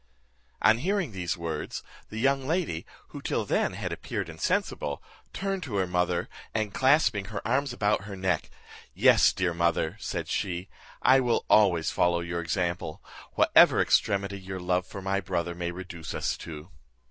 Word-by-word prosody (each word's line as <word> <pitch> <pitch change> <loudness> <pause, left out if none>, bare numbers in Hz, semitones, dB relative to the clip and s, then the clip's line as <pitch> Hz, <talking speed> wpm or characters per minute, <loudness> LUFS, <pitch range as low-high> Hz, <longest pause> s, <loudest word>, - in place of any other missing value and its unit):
On 110 +1 +5
hearing 190 - 0
these 90 -4 -3
words, 80 -3 -4 0.3
the 110 - -7
young 135 +2 +1
lady, 160 - -1 0.2
who - - -8
till - - -1
then - - +1
had - - -4
appeared - - -4
insensible, 70 -1 -2 0.3
turned 195 -1 -2
to 125 - -5
her 95 -2 +2
mother, 90 -1 0 0.3
and 110 -2 -1
clasping 130 -7 +3
her - - -5
arms 135 +3 +1
about 105 -4 0
her 100 -1 -7
neck, 95 -3 -1 0.5
"Yes, - - +6
dear 90 -2 -1
mother," 85 +1 0
said - - -4
she, 90 0 -2 0.3
"I 130 +1 +6
will 125 -3 +1
always 90 -7 +4
follow 85 -1 +2
your 85 0 -3
example, 85 -1 -2 0.3
whatever - - +6
extremity 100 0 +2
your 95 0 -6
love 90 0 0
for 95 - -8
my 100 +1 0
brother 85 -1 -2
may 85 0 -3
reduce 85 -3 -7
us - - -1
to." 80 +2 -9
95 Hz, 160 wpm, -28 LUFS, 85-110 Hz, 0.5 s, Yes